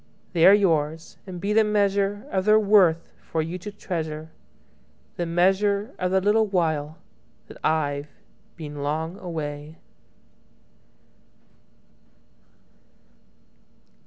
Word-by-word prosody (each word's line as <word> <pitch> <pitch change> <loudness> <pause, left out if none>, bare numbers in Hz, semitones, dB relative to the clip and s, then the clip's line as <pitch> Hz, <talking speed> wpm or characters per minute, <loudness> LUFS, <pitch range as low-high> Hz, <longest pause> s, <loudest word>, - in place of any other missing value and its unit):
They 170 -1 +5
are 195 - +9
yours, 160 -5 0
and 180 -2 -7
be 200 +3 -1
the 220 - +5
measureOf 200 -2 0
their 215 0 +6
worth 195 -6 +3
for 160 -1 -2
you 170 +3 -5
to 210 +4 -7
treasure, 160 -5 -5 0.9
The 175 - -2
measure 200 +6 +1
of 180 - 0
the 190 +1 +3
little 210 +3 +2
whileThat 160 -5 -4
I've 145 -2 0 0.5
been 150 -3 -7
long 160 +6 -3
away. 155 -2 -6
175 Hz, 100 wpm, -24 LUFS, 155-200 Hz, 0.9 s, are